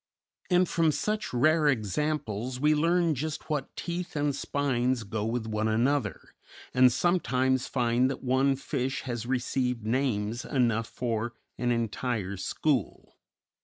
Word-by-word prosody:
And 180 0 +4
from 165 -2 +2
such 210 +6 -2
rare 155 +5 +3
examples 125 0 -1
we 150 +2 +4
learn 165 +2 +2
just 155 +3 -4
what 145 -3 -2
teeth 175 0 -4
and 145 -1 0
spines 130 -4 0
go 105 +1 -3
with 115 0 -2
one 110 0 -1
another, 125 +6 0 0.4
and 125 0 +6
sometimes 130 -6 +1
find 125 0 +2
that 135 - -5
one 135 +2 +2
fish 135 -1 -2
has 120 -3 -4
received 125 -2 -1
names 115 -2 0
enough 115 -4 +1
for 115 0 -2 0.3
an 120 0 +1
entire 115 -3 -1
school. 130 +8 -2
130 Hz, 130 wpm, -28 LUFS, 115-150 Hz, 0.4 s, and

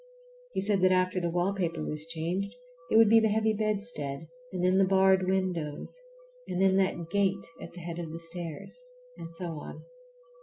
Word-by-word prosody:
He - - 0
said 200 -1 +2
that 185 0 +5
after 185 0 +2
the 170 - 0
wallpaper 175 -2 -1
was 150 +1 -3
changed 175 +6 -3 0.3
it - - +4
would 225 -1 +8
be 225 +2 +7
the 220 - +3
heavy 220 +1 +2
bedstead, 205 - -2 0.2
and 180 -1 -3
then 185 +1 +4
the - - +6
barred 190 -1 +4
windows, 180 - -2 0.5
and 180 - -3
then 190 0 +4
that 175 -3 0
gate 200 -1 +1 0.2
at - - -9
the 175 - -9
head 170 0 -5
of 165 -2 -5
the 165 - -6
stairs, 165 - -6 0.3
and 165 - -8
so 165 -2 -4
on. - - -9
185 Hz, 185 wpm, -29 LUFS, 165-195 Hz, 0.5 s, would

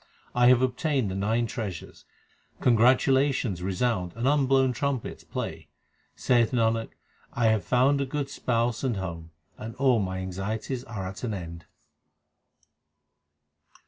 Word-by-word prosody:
I 120 0 +4
have 125 0 +6
obtained 130 -3 0
the - - -4
nine 110 +4 0
treasures; 105 -6 -6 0.5
congratulations 125 -3 +3
resound 95 -1 -1
and 120 +3 -1
unblown 135 -2 +3
trumpets 135 -1 -3
play. - - -5 0.5
Saith 120 -1 +2
Nanak, 115 -1 +1 0.4
I 120 - 0
have 110 -2 +1
found 135 +3 +3
a - - 0
good 145 +1 -2
Spouse 120 -3 -1
and 125 -6 0
home, 85 -3 -6 0.3
and 115 +1 -7
all 130 -4 +3
my 95 -2 -2
anxieties 100 +7 -4
are 110 -6 -5
at 95 +5 -8
an 110 -4 -2
end. 85 -2 -8
115 Hz, 130 wpm, -27 LUFS, 95-130 Hz, 0.5 s, have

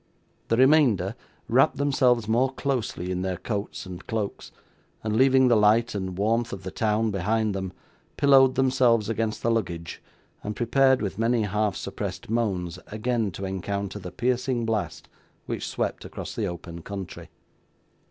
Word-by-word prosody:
The 115 - +1
remainder 125 - +4 0.3
wrapped 130 +2 +3
themselves 130 -5 +2
more 125 +4 +2
closely 120 -10 -2
in 90 0 -2
their 95 -1 -2
coats 105 -1 -4
and 90 0 -9
cloaks, 110 -3 -3 0.5
and 110 -1 -1
leaving 130 +1 +5
the 120 - +5
light 110 +2 +4
and 95 -3 -4
warmth 115 +4 +1
of 95 -4 -7
the 95 - -5
town 110 0 +1
behind 105 +3 0
them, 95 -1 -4 0.5
pillowed 135 -2 +5
themselves 125 -4 +3
against 110 -1 -2
the 115 - +2
luggage, 85 -7 -3 0.4
and 105 0 -4
prepared, 130 +1 +3
with 100 +1 -4
many 115 0 +2
half 105 0 0
suppressed - - -5
moans, 90 -7 -1
again 110 0 -1
to 95 - -5
encounter 100 +2 -3
the 90 -3 -8
piercing 125 +1 0
blast 110 -2 -2 0.4
which - - -4
swept - - -2
across - - -7
the - - -2
open 85 -1 -7
country. 95 0 -7
110 Hz, 150 wpm, -26 LUFS, 100-125 Hz, 0.5 s, leaving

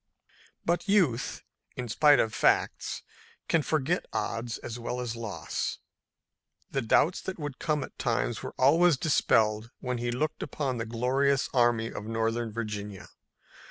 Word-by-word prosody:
But 175 +4 0
youth, 165 - +2 0.3
in 125 - -4
spite 145 +6 +5
of 110 - +1
facts, - - +1 0.4
can 165 - +3
forget 155 +3 0
odds 115 +2 -2
as 120 0 -7
well 125 +1 -3
as 120 -2 -3
loss. 115 -3 -3 0.9
The 135 - 0
doubts 145 +8 +3
that 190 - -5
would 145 -4 -6
come 150 -3 0
at - - -11
times - - 0
were - - -7
always 160 +4 +5
dispelled 110 -6 +2
when 125 -1 -3
he 120 0 -1
looked 150 +6 -2
upon 130 -5 -2
the 115 - -3
glorious 130 +4 +1
Army 120 -3 +3
of 105 - -6
Northern 115 0 -1
Virginia. 105 -3 -5
125 Hz, 145 wpm, -29 LUFS, 115-145 Hz, 0.9 s, spite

